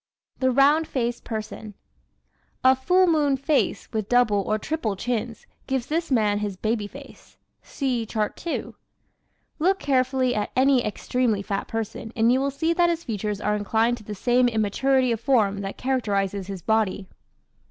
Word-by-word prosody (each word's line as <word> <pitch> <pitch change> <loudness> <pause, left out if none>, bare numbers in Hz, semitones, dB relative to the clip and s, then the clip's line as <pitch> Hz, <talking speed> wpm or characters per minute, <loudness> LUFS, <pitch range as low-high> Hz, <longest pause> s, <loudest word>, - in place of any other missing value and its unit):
The 260 - +2
Round 285 +5 +4
Faced 240 -2 -2
Person 220 -1 -6
¶ 210 - -10 0.9
A 260 0 +6
"full 360 +8 +3
moon" 300 -5 +2
face 275 +2 0
with 215 -2 -2
double 245 -5 +3
or 215 +2 -1
triple 225 -4 -2
chins 230 +1 -3 0.2
gives 265 -2 -1
this 330 +3 -2
man 210 -5 +2
his 205 -2 -4
"baby 215 0 -1
face." 275 +6 -14 0.2
(See 250 -5 -2
Chart 215 -1 -2
2) 340 - -4 0.9
Look 375 +5 +3
carefully 260 -3 +1
at 210 -2 -2
any 260 -1 +4
extremely 215 0 -1
fat 200 -1 -3
person 225 0 -5
and 230 +1 +3
you 255 - +3
will 275 +1 0
see 320 +5 0
that 345 0 +3
his 335 -1 -2
features 210 - -3
are 210 0 0
inclined 225 +3 +1
to 220 - -13
the 210 0 -6
same 245 +4 +3
immaturity 245 +4 +1
of 230 - -1
form 215 -6 +2
that 195 0 -5
characterizes 200 -7 -1
his 195 -4 -7
body. 215 -3 0
240 Hz, 165 wpm, -24 LUFS, 210-270 Hz, 0.9 s, A